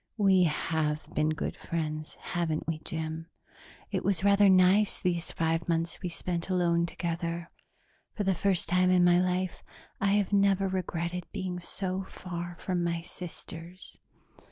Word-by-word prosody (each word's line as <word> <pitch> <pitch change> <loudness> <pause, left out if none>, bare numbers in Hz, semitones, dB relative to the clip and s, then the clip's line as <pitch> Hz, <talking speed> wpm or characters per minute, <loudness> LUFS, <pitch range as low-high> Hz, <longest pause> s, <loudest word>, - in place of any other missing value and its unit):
"We 190 -3 +5
have 155 -1 0
been 155 +1 +2
good 155 - -2
friends, 155 -2 -4
haven't 165 -3 -2
we, 160 -1 -1
Jim? 160 +1 -5 0.6
It - - -1
was 195 -3 +1
rather 200 0 +6
nice 190 +3 +5
these 175 -2 -1
five 165 +1 0
months 165 0 0
we 180 - -2
spent 170 +1 -3
alone 170 -2 +2
together. 170 0 -3 0.6
For 210 - -1
the 195 -1 +2
first 185 0 +1
time 180 +1 +3
in 180 -1 +5
my 175 0 +6
life, 185 0 -1 0.4
I 195 0 +2
have 205 -1 +1
never 195 -1 +4
regretted 180 -1 -2
being 185 -3 -3
so 185 +1 -2
far 175 -2 -6
from 180 -1 -1
my 170 -1 -1
sisters. 175 0 -9
175 Hz, 150 wpm, -29 LUFS, 165-185 Hz, 0.6 s, rather